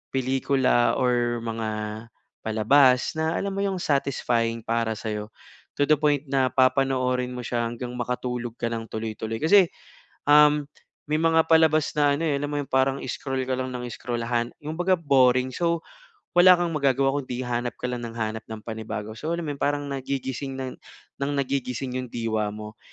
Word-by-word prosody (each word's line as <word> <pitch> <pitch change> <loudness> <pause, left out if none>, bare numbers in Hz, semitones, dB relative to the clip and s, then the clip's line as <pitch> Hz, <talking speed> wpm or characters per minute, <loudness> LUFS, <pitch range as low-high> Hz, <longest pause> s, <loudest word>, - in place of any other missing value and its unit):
pelikula 130 -1 +2
or 120 -2 +1
mga, 115 -1 -3 0.7
palabas 125 +4 +4
na 160 +1 0
alam 200 - -2
mo 195 - -4
yung 200 -1 0
satisfying 120 -7 0
para 115 0 -1
sa'yo, 105 -1 -4 0.5
to 145 - +2
the 150 0 +3
point 145 -2 +2
na 135 -2 +3
papanoorin 130 -1 +2
mo 125 - -5
siya 120 0 -1
hanggang 120 +1 -6
makatulog 125 -1 -3
ka 120 - -2
nang 115 -1 -4
tuloy-tuloy. 110 0 -4
Kasi, 185 +4 +6 0.6
um, 150 0 +6 0.4
may 150 - -1
mga 165 0 +4
palabas 160 -2 +4
na 145 -2 +3
ano, 165 - -2
eh, 155 - +1
alam 145 - -2
mo 145 - -2
yun 145 - -2
parang 130 +1 +2
scroll 135 +1 -3
ka 130 - -1
lang 130 0 -3
ng 125 -1 -5
scrollahan, 120 0 -2
kumbaga 175 +5 0
boring. 130 -4 +3
So, 170 +2 -1 0.5
wala 180 +1 +8
kang 175 -1 -1
magagawa 140 -2 +1
kung 140 - -7
'di 125 0 -3
hanap 120 -1 -2
ka - - -27
lang 125 - -3
ng 115 - -10
hanap 110 -1 -3
ng 110 -1 -7
panibago. 110 -1 -5
So, 160 +7 -2
alam 170 - -4
mo 150 - -2
yun - - -17
parang 145 0 +1
nagigising, 135 0 -4
nang 130 -1 -5 0.6
nagigising 130 -2 -2
'yong 130 - -5
diwa 110 -2 -1
mo. 105 +1 -9
130 Hz, 175 wpm, -25 LUFS, 120-145 Hz, 0.7 s, wala